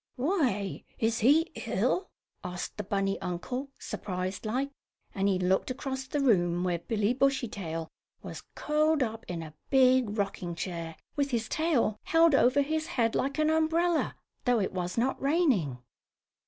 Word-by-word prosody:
"Why, 250 Hz, -, 0 dB
is 225 Hz, +1 st, +1 dB
he 300 Hz, +8 st, +4 dB, 0.2 s
ill?" 370 Hz, -, 0 dB, 0.3 s
asked 180 Hz, -1 st, -5 dB
the 210 Hz, -, -3 dB
bunny 195 Hz, 0 st, -1 dB
uncle, 245 Hz, +10 st, -4 dB
surprised 185 Hz, +2 st, -4 dB
like, 265 Hz, +5 st, -1 dB, 0.4 s
and 195 Hz, -2 st, +1 dB
he 195 Hz, -2 st, +2 dB
looked 185 Hz, +4 st, +1 dB
across 265 Hz, 0 st, -4 dB
the 290 Hz, -, -1 dB
room 175 Hz, -9 st, +3 dB
where 175 Hz, -2 st, 0 dB
Billy 210 Hz, +5 st, 0 dB
Bushytail 210 Hz, -12 st, -1 dB, 0.4 s
was -, -, -7 dB
curled 305 Hz, -1 st, +2 dB
up 225 Hz, -1 st, -4 dB
in 170 Hz, -2 st, -4 dB
a 155 Hz, -1 st, -10 dB, 0.2 s
big 255 Hz, -5 st, +4 dB
rocking 185 Hz, -4 st, -2 dB
chair, 170 Hz, -2 st, -4 dB, 0.2 s
with 285 Hz, -1 st, +1 dB
his 230 Hz, -3 st, -1 dB
tail 275 Hz, -10 st, +1 dB
held 330 Hz, -1 st, +5 dB
over 275 Hz, +1 st, +4 dB
his 315 Hz, +2 st, -2 dB
head 230 Hz, -2 st, +1 dB
like 275 Hz, +2 st, -1 dB
an 310 Hz, 0 st, +3 dB
umbrella, 325 Hz, +1 st, +2 dB, 0.3 s
though 245 Hz, -2 st, +3 dB
it 190 Hz, -, -1 dB
was 180 Hz, +1 st, -3 dB
not 255 Hz, +3 st, 0 dB
raining. 270 Hz, -, +2 dB
235 Hz, 155 wpm, -29 LUFS, 185-280 Hz, 0.4 s, held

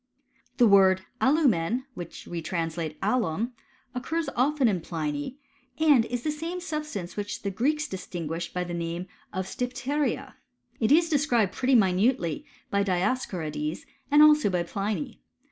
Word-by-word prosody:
The 245 Hz, -, +6 dB
word 190 Hz, -2 st, +5 dB, 0.2 s
alumen^ 255 Hz, -, +3 dB
which 175 Hz, -6 st, -8 dB
we 170 Hz, -1 st, -5 dB
translate 165 Hz, -2 st, -3 dB
alum, 215 Hz, +1 st, 0 dB, 0.4 s
occurs 320 Hz, +6 st, -2 dB
often 270 Hz, +1 st, +3 dB
in 190 Hz, -6 st, +1 dB
Pliny; 150 Hz, -, -3 dB, 0.4 s
and 295 Hz, -7 st, +5 dB
is 245 Hz, 0 st, -4 dB
the 305 Hz, -, 0 dB
same 330 Hz, +4 st, -4 dB
substance 305 Hz, -, -5 dB
which 205 Hz, 0 st, -4 dB
the 200 Hz, -, -1 dB
Greeks 290 Hz, +9 st, 0 dB
distinguished 170 Hz, -3 st, -5 dB
by 180 Hz, -, -2 dB
the 175 Hz, -1 st, -5 dB
nameof 170 Hz, +1 st, -3 dB, 0.3 s
<rrv?rrijpto(s^y/?^ma). 250 Hz, +9 st, -2 dB, 0.5 s
It 225 Hz, +2 st, +2 dB
is 330 Hz, +3 st, +6 dB
described 260 Hz, -, +2 dB
pretty 260 Hz, 0 st, +2 dB
minutely 190 Hz, -, +2 dB, 0.2 s
by 200 Hz, 0 st, +2 dB
Dioscorides, 175 Hz, -6 st, -1 dB, 0.2 s
and 295 Hz, +1 st, +7 dB
also 300 Hz, -7 st, +6 dB
by 180 Hz, -2 st, 0 dB
Pliny. 210 Hz, +8 st, -3 dB
210 Hz, 135 wpm, -27 LUFS, 175-275 Hz, 0.5 s, and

